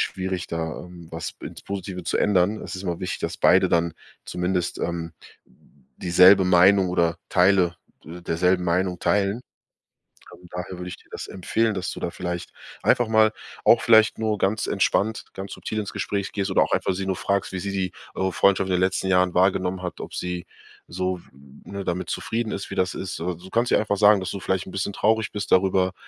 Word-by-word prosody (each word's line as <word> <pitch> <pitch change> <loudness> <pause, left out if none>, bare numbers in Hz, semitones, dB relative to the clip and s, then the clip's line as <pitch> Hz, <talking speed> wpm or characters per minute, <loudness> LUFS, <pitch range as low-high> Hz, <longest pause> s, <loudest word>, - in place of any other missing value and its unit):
schwierig, 95 -2 -2
da, 80 -1 -4
ähm, 85 -2 -13
was 80 -1 -5
ins - - -9
Positive 95 -2 -5
zu - - -1
ändern. 100 +1 +2
Es - - -6
ist 95 - -7
immer 85 -2 -3
wichtig, 90 - -4
dass - - -4
beide - - +5
dann 85 -1 +1 0.3
zumindest, 90 0 -2
ähm, 85 -1 -3 0.8
dieselbe 90 +2 +6
Meinung 90 +1 +5
oder 85 -2 +1
Teile, 90 -1 +4 0.3
äh, 85 +3 -9
derselben 90 +2 +1
Meinung 90 +1 0
teilen. 100 +4 +1 0.9
Ähm, 90 - -15
daher 90 +1 -6
würde 90 0 -6
ich - - -6
dir - - -24
das - - -6
empfehlen, 110 +4 0
dass 95 -1 -3
du - - -7
da - - -2
vielleicht 90 -1 -5 0.3
einfach 120 - +3
mal 110 -1 +5 0.3
auch 115 - +6
vielleicht 110 -2 +5
nur 110 -2 0
ganz 105 +3 +1
entspannt, 105 +2 0
ganz 95 0 -7
subtil 110 - -4
ins 105 - -4
Gespräch 100 -1 -2
gehst 100 -1 -1
oder - - +3
auch - - -5
einfach - - +1
sie 95 +1 -4
nur 95 -1 -1
fragst, 100 0 -1
wie 95 - -2
sie 100 +2 -4
die 95 -2 -1 0.2
eure 95 0 0
Freundschaft 95 +1 +3
in - - -1
den - - +1
letzten 95 0 0
Jahren 90 -1 +3
wahrgenommen 95 0 +1
hat, 90 - -5
ob - - -8
sie 90 0 -4 0.4
so, 90 0 -3 0.4
ne, 100 0 -6
damit 90 +1 -2
zufrieden 115 -1 -2
ist, 100 - -5
wie - - -4
das 95 - 0
ist. 95 - -5
Äh, - - -4
du 90 +3 -13
kannst 120 +1 +1
ihr - - +5
einfach 105 -1 -1
sagen, 105 0 +6
dass 95 - -4
du 100 - -5
vielleicht 95 0 -1
’n - - -8
bisschen 95 +2 -2
traurig 110 +1 +1
bist 105 -2 -5
darüber, 95 0 +3
95 Hz, 205 wpm, -24 LUFS, 90-100 Hz, 0.9 s, dieselbe